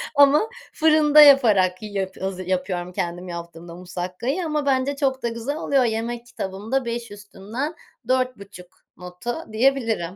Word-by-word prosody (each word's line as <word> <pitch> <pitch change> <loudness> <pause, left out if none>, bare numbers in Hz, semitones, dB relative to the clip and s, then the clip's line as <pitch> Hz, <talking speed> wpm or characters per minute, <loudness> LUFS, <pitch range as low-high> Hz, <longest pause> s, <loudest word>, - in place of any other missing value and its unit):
ama 285 +9 +5 0.2
fırında 305 -1 +5
yaparak 215 -11 +5
yip 195 -3 -5
haz 185 -1 -4
yapıyorum 180 -1 -2
kendim 180 -1 -4
yaptığımda 170 -1 -8
musakkayı 185 - -4
ama 300 -2 -1
bence 270 0 +1
çok 265 -2 -1
da - - +1
güzel 230 +5 -4
oluyor. 275 -4 +2
Yemek 235 +1 -2
kitabımda 225 +4 -3
5 235 -1 -4
üstünden 205 - -6 0.3
4,5 230 -8 -2 0.3
notu 180 +7 -6 0.2
diyebilirim. 225 -7 +1
225 Hz, 130 wpm, -23 LUFS, 185-270 Hz, 0.3 s, ama